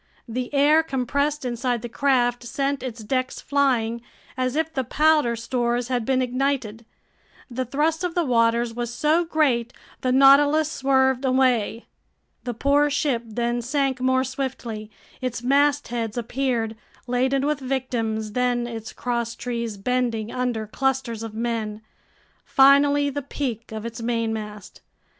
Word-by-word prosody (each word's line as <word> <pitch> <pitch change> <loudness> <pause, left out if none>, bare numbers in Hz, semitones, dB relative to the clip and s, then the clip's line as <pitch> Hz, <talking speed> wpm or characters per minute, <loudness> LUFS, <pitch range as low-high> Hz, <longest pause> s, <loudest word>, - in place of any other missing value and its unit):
The 245 +2 -4
air 295 +3 +5
compressed 280 0 -1
inside 245 -1 -1
the - - -3
craft 245 -1 +1
sent 275 +2 -2
its 240 -3 -6
decks 255 +3 -2
flying, 245 -5 +1 0.3
as 255 +1 -1
if 320 +1 -1
the 265 - -1
powder 300 -2 +3
stores 240 +1 -1
had 245 -3 -1
been 260 0 +2
ignited. 250 -3 -2 0.7
The 255 +2 -2
thrust 310 +7 0
of 355 -2 -2
the 350 - +2
waters 235 -1 +2
was 240 0 -3
so 305 +7 +2
great, 270 -8 +1 0.3
the 255 - +1
Nautilus 285 +3 +5
swerved 265 -2 +2
away. 255 -4 +1 0.6
The 245 -2 -3
poor 285 +4 +3
ship 285 -4 0
then 240 +2 -1
sank 265 +1 -1
more 260 0 +2
swiftly. 255 -5 -5 0.3
Its 250 -2 -3
mastheads 260 -4 +1
appeared, 240 -2 -1 0.3
laden 260 +2 +1
with 300 -1 0
victims, 240 -5 -2
then 245 +1 0
its 225 -2 -7
crosstrees 235 -2 -3
bending 230 0 -1
under 245 -3 -2
clusters 260 -1 -1
of 225 -1 -7
men, 225 -2 -2 0.6
finally 280 +1 +5
the 285 +1 -3
peak 250 -5 -4
of 220 0 -6
its 235 0 -6
mainmast. 220 -3 -3
250 Hz, 135 wpm, -24 LUFS, 235-275 Hz, 0.7 s, air